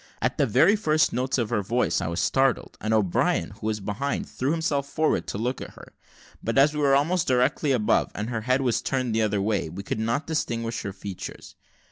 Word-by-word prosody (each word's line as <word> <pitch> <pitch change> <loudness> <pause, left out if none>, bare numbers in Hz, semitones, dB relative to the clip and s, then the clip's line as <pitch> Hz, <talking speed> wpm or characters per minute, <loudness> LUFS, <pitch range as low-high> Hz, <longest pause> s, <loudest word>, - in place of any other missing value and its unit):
At - - -1
the - - +3
very 205 - +5
first 155 -7 +2
notes 130 +2 0
of 115 -4 -1
her 105 - +1
voice 120 +5 0
I - - -2
was 85 +2 -2
startled, 135 -2 +1
and 110 - -2
O'Brien, 105 -5 +1
who 110 - -7
was 110 -1 -1
behind, 105 +8 -3
threw 130 - -3
himself 150 -3 0
forward 155 +2 0
to - - -4
look 120 +4 -2
at - - -9
her; - - -14 0.5
but 115 - -1
as 145 +3 +5
we 150 - -3
were 140 -2 +4
almost 160 +5 +1
directly 130 +3 +2
above, 115 -5 +2
and 105 +4 -4
her 115 -2 -2
head 130 +4 +1
was 125 -3 +1
turned 130 -3 -1
the 110 - +2
other 105 -2 +1
way, 105 -6 0
we 95 +5 -7
could 105 - -3
not 115 +6 -1
distinguish 115 -7 -2
her 100 - -4
features. 95 -1 -8
120 Hz, 220 wpm, -25 LUFS, 105-140 Hz, 0.5 s, very